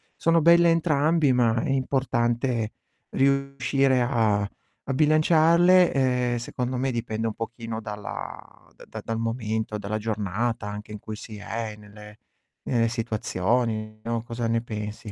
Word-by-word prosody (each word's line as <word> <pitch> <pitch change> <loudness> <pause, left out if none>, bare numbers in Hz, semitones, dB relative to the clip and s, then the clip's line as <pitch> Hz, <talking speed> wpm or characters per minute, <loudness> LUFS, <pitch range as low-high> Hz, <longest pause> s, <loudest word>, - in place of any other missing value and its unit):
sono 165 0 +3
belle 170 +1 +6
entrambi, 155 -3 +3
ma 120 -2 +2
è 160 - -3
importante 120 -3 0 0.4
riuscire 135 -1 +2
a 110 -4 +2 0.5
a - - +1
bilanciarle, 165 +4 +5 0.4
e, - - 0
secondo 125 +1 -3
me 130 +1 0
dipende 115 -1 -2
un 110 - -2
pochino 115 0 -6
dalla 105 -1 -8
da - - -15
da - - -7
dal 115 0 -3
momento, 110 -2 -2
dalla 105 +1 -3
giornata 110 +1 -2
anche 105 +1 -7
in 105 - -7
cui 110 0 -7
si 110 -1 -9
è, 110 +1 -5
nelle 105 0 -14 0.5
nelle 115 -2 +2
situazioni, 110 0 -1
no, 115 -1 -2
cosa 120 0 -4
ne 115 0 +1
pensi? 105 -2 -6
115 Hz, 140 wpm, -25 LUFS, 110-135 Hz, 0.5 s, belle